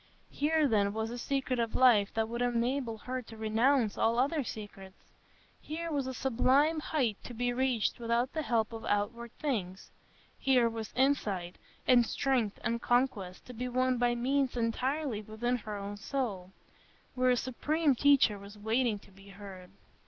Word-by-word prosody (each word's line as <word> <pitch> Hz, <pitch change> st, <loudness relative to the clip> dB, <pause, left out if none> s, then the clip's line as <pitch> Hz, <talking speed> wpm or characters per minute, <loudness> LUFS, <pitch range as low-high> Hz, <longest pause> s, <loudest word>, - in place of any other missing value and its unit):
Here, 305 Hz, +1 st, +2 dB
then, 205 Hz, -4 st, +2 dB
was 220 Hz, +1 st, -2 dB
a 240 Hz, -, -5 dB
secret 265 Hz, -1 st, -1 dB
of 230 Hz, -1 st, -1 dB
life 225 Hz, -6 st, +5 dB
that 225 Hz, 0 st, +1 dB
would 235 Hz, +1 st, -4 dB
enable 245 Hz, 0 st, 0 dB
her 255 Hz, +3 st, -4 dB
to 225 Hz, -2 st, -12 dB
renounce 225 Hz, +2 st, +2 dB
all 230 Hz, +1 st, +2 dB
other 280 Hz, +4 st, +1 dB
secrets; 195 Hz, -4 st, -9 dB, 0.6 s
here 330 Hz, +2 st, -5 dB
was 280 Hz, -3 st, -1 dB
a 260 Hz, -, -3 dB
sublime 270 Hz, +6 st, +2 dB
height 260 Hz, -9 st, -1 dB
to 245 Hz, -, -8 dB
be 245 Hz, +1 st, 0 dB
reached 250 Hz, -3 st, 0 dB
without 235 Hz, +2 st, 0 dB
the 315 Hz, -, -1 dB
help 230 Hz, -5 st, 0 dB
of 225 Hz, -, -7 dB
outward 230 Hz, +3 st, -1 dB
things; 200 Hz, -, -3 dB, 0.5 s
here 255 Hz, -3 st, +4 dB
was 225 Hz, -1 st, -5 dB
insight, 210 Hz, -10 st, 0 dB, 0.3 s
and 245 Hz, -2 st, +6 dB
strength, 255 Hz, -7 st, 0 dB
and 235 Hz, 0 st, -1 dB
conquest, 240 Hz, -7 st, 0 dB
to 250 Hz, -, -10 dB
be 250 Hz, +2 st, -4 dB
won 255 Hz, 0 st, +1 dB
by 240 Hz, 0 st, +2 dB
means 260 Hz, +1 st, 0 dB
entirely 250 Hz, +1 st, -1 dB
within 220 Hz, +4 st, -2 dB
her 215 Hz, -2 st, -6 dB
own 200 Hz, +1 st, -6 dB
soul, 205 Hz, -6 st, -3 dB, 0.6 s
where 255 Hz, 0 st, +2 dB
a 250 Hz, -, +4 dB
supreme 295 Hz, +5 st, +1 dB
Teacher 260 Hz, -6 st, +4 dB
was 200 Hz, +1 st, -12 dB
waiting 220 Hz, +1 st, +1 dB
to 200 Hz, -, -18 dB
be 195 Hz, +1 st, -17 dB
heard. 190 Hz, -2 st, -11 dB
240 Hz, 165 wpm, -31 LUFS, 215-260 Hz, 0.6 s, and